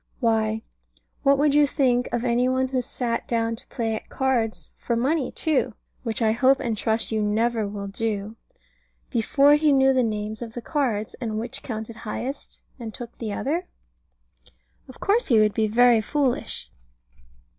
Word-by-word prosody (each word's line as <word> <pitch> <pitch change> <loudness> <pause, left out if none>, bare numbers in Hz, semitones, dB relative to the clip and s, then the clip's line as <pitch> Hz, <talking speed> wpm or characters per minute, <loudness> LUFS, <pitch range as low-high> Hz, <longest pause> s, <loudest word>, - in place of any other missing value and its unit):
Why, 220 -2 +1 0.6
what 280 0 +4
would 290 0 +3
you 295 0 +5
think 250 -3 +1
of 240 0 -1
any 245 +1 +2
one 260 0 +1
who 255 -1 0
sat 235 -1 -3
down 230 -1 0
to 260 +4 -12
play 225 -3 -2
at 220 - -6
cards 250 -5 -1
for 235 - -2
money 265 +3 0
too 265 -7 0 0.3
(which 230 -1 -2
I 220 - +4
hope 260 +4 +4
and 240 -5 -1
trust 220 +2 -1
you 220 -1 0
never 220 +1 +1
will 200 0 -5
do) 210 +1 -3 0.8
before 275 +4 +4
he 295 0 +4
knew 270 -1 +5
the 260 - +3
names 215 -1 -2
of 230 -2 -6
the - - -3
cards, 235 -9 -1
and 220 -3 -2
which 230 +2 -4
counted 220 -1 -6
highest, 250 +5 -6 0.2
and 225 -3 -6
took 240 -1 -8
the 220 -3 -3
other? 325 - -2 1.2
Of - - -12
course 445 +5 +2
he 230 -5 +5
would 210 -1 +3
be 220 -1 +1
very 235 +1 +5
foolish. 270 +2 -1
235 Hz, 170 wpm, -24 LUFS, 220-265 Hz, 1.2 s, you